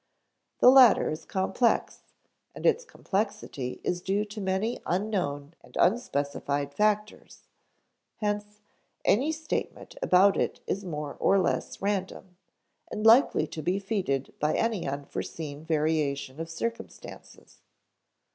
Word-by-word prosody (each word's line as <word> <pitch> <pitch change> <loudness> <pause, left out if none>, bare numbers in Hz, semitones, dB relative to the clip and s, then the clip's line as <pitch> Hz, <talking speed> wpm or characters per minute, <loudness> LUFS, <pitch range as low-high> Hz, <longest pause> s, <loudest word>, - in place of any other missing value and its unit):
The 250 - +9
latter 255 -5 +7
is 155 +1 -6
complex, 200 +5 0 0.5
and - - -7
its - - +3
complexity 200 - -3
is 175 0 -1
due 200 +3 0
to 210 0 -8
many 190 +5 -1
unknown 170 -7 -2
and - - -12
unspecified 145 - 0
factors; 210 +2 -1 0.7
hence, 210 0 -3 0.4
any 270 +9 +3
statement 315 +8 -4
about 195 - +5
it - - -1
is 200 - -2
more 150 -5 -5
or 195 - +4
less 190 +1 -1
random, 190 -2 -3 0.5
and 215 - -4
likely 235 +5 +6
to 155 - -7
be 175 +4 0
defeated 195 - -2
by 150 +1 +1
any 225 -8 0
unforeseen 145 +2 -5
variation 150 -3 -1
of 165 0 -5
circumstances. 230 +8 -7
190 Hz, 120 wpm, -28 LUFS, 150-210 Hz, 0.7 s, The